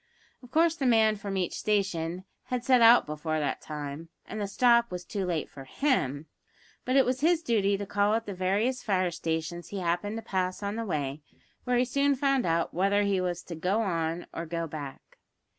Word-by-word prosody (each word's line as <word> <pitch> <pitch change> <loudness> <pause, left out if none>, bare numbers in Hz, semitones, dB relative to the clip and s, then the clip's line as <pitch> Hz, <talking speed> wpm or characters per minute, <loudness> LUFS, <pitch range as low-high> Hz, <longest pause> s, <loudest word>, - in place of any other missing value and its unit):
Of 250 - -14
course 325 +4 +3
the 275 -5 -1
man 220 -2 +4
from 200 -1 -4
each 180 -2 -1
station 185 -4 -1 0.2
had 250 -1 -3
set 255 -2 +5
out 230 +1 +7
before 155 +1 -3
that 145 -2 -2
time, 150 +1 -6 0.2
and 215 +1 -6
the 200 - -1
"stop" 235 +3 +4
was 180 -1 -6
too 195 -3 -3
late 165 -4 -1
for 135 - -11
him, 145 - 0 0.6
but 255 - 0
it 270 - +6
was 255 +1 -1
his 335 +1 +3
duty 205 -5 +2
to 200 - -4
call 205 +2 +1
at 225 0 -2
the 200 - -5
various 200 +8 0
fire 185 -5 +1
stations 165 +1 -3
he 200 - -6
happened 180 +4 -1
to 225 - -6
pass 185 -2 -2
on 200 +1 -2
the 230 0 -3
way, 145 -5 -3 0.4
where 250 -1 +2
he 250 - +3
soon 280 +3 +2
found 270 -4 +1
out 165 0 0
whether 200 +3 +2
he 200 -2 +1
was 175 -1 -2
to 175 - -8
"go 190 +7 0
on" 165 -3 -2
or 165 - -4
to - - -15
"go 165 0 -2
back." 145 -3 -9
195 Hz, 210 wpm, -28 LUFS, 170-235 Hz, 0.6 s, out